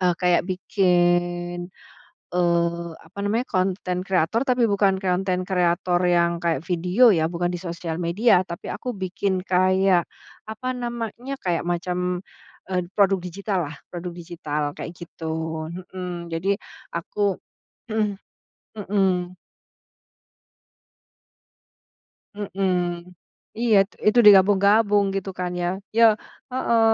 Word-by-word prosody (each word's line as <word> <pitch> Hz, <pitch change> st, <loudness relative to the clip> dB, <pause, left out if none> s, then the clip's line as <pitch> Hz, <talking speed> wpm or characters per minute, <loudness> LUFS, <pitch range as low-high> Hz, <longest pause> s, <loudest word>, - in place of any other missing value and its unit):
eee, 180 Hz, -2 st, +3 dB
kayak 180 Hz, -1 st, +4 dB
bikin, 175 Hz, -1 st, +1 dB, 0.6 s
eee, 170 Hz, -1 st, +1 dB, 0.2 s
apa 165 Hz, -, -15 dB
namanya 225 Hz, +5 st, 0 dB
konten 185 Hz, -1 st, -1 dB
kreator 190 Hz, +4 st, +1 dB
tapi 250 Hz, -1 st, +2 dB
bukan 195 Hz, -2 st, +2 dB
konten 185 Hz, -1 st, 0 dB
kreator 175 Hz, -1 st, +1 dB
yang 170 Hz, -1 st, +3 dB
kayak 165 Hz, -5 st, +1 dB
video 180 Hz, +7 st, +4 dB
ya, 160 Hz, -2 st, +1 dB
bukan 175 Hz, 0 st, -1 dB
di 175 Hz, -, -4 dB
sosial 170 Hz, -2 st, -5 dB
media. 180 Hz, +3 st, +3 dB
Tapi 170 Hz, -1 st, -8 dB
aku 250 Hz, -, -4 dB
bikin 190 Hz, 0 st, -2 dB
kayak, 185 Hz, -1 st, +3 dB, 0.5 s
apa 220 Hz, +4 st, -5 dB
namanya, 240 Hz, +2 st, -4 dB
kayak 170 Hz, -2 st, 0 dB
macam, 180 Hz, +1 st, -1 dB, 0.5 s
eee, 180 Hz, -2 st, 0 dB
produk 195 Hz, -1 st, +4 dB
digital 195 Hz, +2 st, -3 dB
lah, 160 Hz, -, -9 dB
produk 175 Hz, 0 st, -6 dB
digital 160 Hz, -3 st, -4 dB
kayak 170 Hz, -, -6 dB
gitu, 170 Hz, -1 st, -9 dB, 0.7 s
hmm 180 Hz, -2 st, -5 dB
jadi 165 Hz, +4 st, -2 dB, 0.5 s
aku 195 Hz, +3 st, -1 dB, 1.2 s
mhm. 190 Hz, -3 st, -1 dB, 3.0 s
Mhm. 195 Hz, -1 st, -3 dB, 0.9 s
Iya 235 Hz, -3 st, +4 dB
tu -, -, -24 dB
itu 225 Hz, -, +3 dB
digabung-gabung 205 Hz, +1 st, +6 dB
gitu 195 Hz, 0 st, -3 dB
kan 180 Hz, -1 st, -2 dB
ya. 175 Hz, -, 0 dB, 0.3 s
Ya 230 Hz, -, +8 dB, 0.5 s
heeh. 235 Hz, -3 st, +2 dB
180 Hz, 110 wpm, -23 LUFS, 175-200 Hz, 3.0 s, Ya